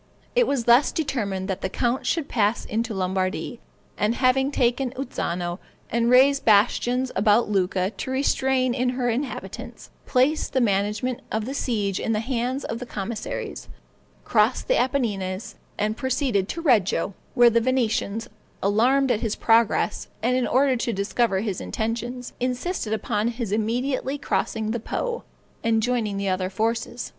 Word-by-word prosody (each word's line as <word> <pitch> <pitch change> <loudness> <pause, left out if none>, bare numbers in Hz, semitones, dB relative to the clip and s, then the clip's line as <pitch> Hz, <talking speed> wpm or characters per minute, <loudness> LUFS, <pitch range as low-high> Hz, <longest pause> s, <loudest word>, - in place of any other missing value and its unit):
It - - +4
was 275 -4 0
thus 240 +4 +5
determined 205 - -2
that 195 -1 -3
the 190 - -2
count 240 +5 -1
should 325 -4 0
pass 215 -1 +1
into 225 0 -2
Lombardy; 190 +5 -2 0.4
and 215 +3 +2
having 265 +1 +3
taken 255 -1 +1
Uzzano, 175 -9 -3 0.3
and 235 +1 +2
raised 275 +3 +5
bastions 245 +4 +3
about 210 +2 +3
Lucca 185 -1 +1
to 260 - -6
restrain 260 -1 +1
in 250 0 0
her 245 -2 +1
inhabitants, 260 +4 -5 0.2
placed 270 +4 +2
the 260 - +3
management 210 +3 0
of 220 0 -1
the 265 - -4
siege 210 -8 -1
in 225 - -1
the 215 - +1
hands 250 +3 -2
of 230 - -4
the 250 - -7
commissaries, 215 +1 -5 0.5
crossed - - +2
the - - +3
Apennines, 210 - -1 0.2
and 215 +1 0
proceeded 255 -7 0
to 335 - -4
Reggio, 205 - +2 0.2
when 240 -2 +6
the 230 - +4
Venetians, 230 -3 0 0.4
alarmed 250 +7 +3
at 220 - 0
his 225 -3 -1
progress, 225 -2 +2 0.2
and 250 +2 +2
in 255 -1 +1
order 265 +1 +3
to 235 0 -1
discover 200 0 0
his 205 -4 -3
intentions, 235 +3 -4
insisted 250 - -2
upon 220 0 0
his 235 -3 -3
immediately 250 +6 -1
crossing 220 -5 -1
the 235 - -1
Po, 475 - -3 0.4
and 225 -1 +2
joining 225 -5 0
the 200 0 -2
other 185 0 0
forces. 230 +4 -2
235 Hz, 155 wpm, -24 LUFS, 210-255 Hz, 0.5 s, when